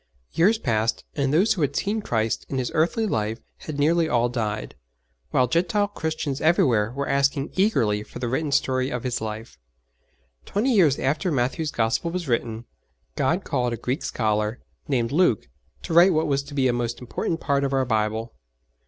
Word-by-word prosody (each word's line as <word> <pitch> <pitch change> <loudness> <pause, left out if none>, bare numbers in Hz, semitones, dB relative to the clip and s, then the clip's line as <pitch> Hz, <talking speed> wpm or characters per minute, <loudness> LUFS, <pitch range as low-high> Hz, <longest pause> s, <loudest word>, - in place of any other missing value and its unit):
Years 205 +7 +3
passed, 115 - -1
and 140 -1 0
those 195 +9 +4
who 185 - -4
had 140 -1 0
seen 215 +2 -1
Christ 110 - -1
in 135 - -2
His 130 -2 -2
earthly 175 +9 +1
life 110 - -1 0.2
had 155 -2 -7
nearly 160 +3 +2
all 120 0 +2
died, 110 -3 -3 0.6
while 130 - +3
Gentile 175 +7 +1
Christians 160 -6 -3
everywhere 120 -9 +3
were 140 +1 -3
asking 140 0 +1
eagerly 115 - +2
for 105 - -10
the 125 0 -3
written 140 +5 -1
story 130 -2 +1
of 125 -3 -4
His 125 -3 -2
life. 110 - -6 0.8
Twenty 245 +6 0
years 165 - +4
after 155 +7 0
Matthew's 140 +4 0
Gospel 115 +7 0
was 175 -1 -4
written, 115 -1 -1 0.5
God - - +1
called 125 -1 -1
a - - -3
Greek 125 +7 -2
scholar, 110 +1 -1 0.3
named 120 -4 0
Luke, 150 - +2 0.4
to - - -4
write 175 +3 +7
what 155 0 +1
was 140 -1 +1
to 145 0 -10
be 135 -2 +3
a 125 - +2
most 120 -1 -2
important 145 +6 -3
part 140 -2 0
of 140 - 0
our 135 -1 +1
Bible. 110 0 -1
135 Hz, 180 wpm, -24 LUFS, 115-160 Hz, 0.8 s, write